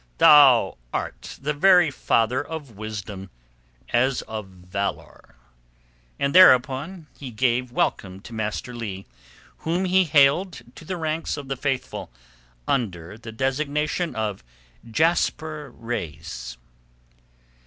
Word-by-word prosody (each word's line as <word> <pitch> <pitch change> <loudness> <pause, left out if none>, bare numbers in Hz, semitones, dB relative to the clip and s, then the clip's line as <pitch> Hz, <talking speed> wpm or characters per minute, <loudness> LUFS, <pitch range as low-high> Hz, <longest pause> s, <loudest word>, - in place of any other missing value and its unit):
"Thou 125 - +6
art - - -5
the 150 +2 -2
very 175 +1 +5
father 125 +1 +1
of 150 -4 -7
wisdom 100 -2 -7 0.6
as 130 +2 +1
of 110 -2 -6
valour." 95 -2 -6 0.8
And 140 0 0
thereupon 155 0 +5
he 135 - -8
gave 125 +1 0
welcome 95 -5 -1
to 115 - -11
Master 110 +3 -4
Leigh, 100 -5 -6 0.5
whom 175 +4 -1
he 185 0 +3
hailed 145 +1 +3
to 160 - -12
the 185 +2 -4
ranks 160 -1 -2
of 140 -2 -8
the 135 - -1
Faithful 130 - -3 0.6
under 95 -8 -2
the 115 +1 -10
designation 145 +7 -1
of 105 -6 -3 0.5
Jasper 155 +1 0
Reis. 80 - -6
130 Hz, 110 wpm, -24 LUFS, 110-155 Hz, 0.8 s, Thou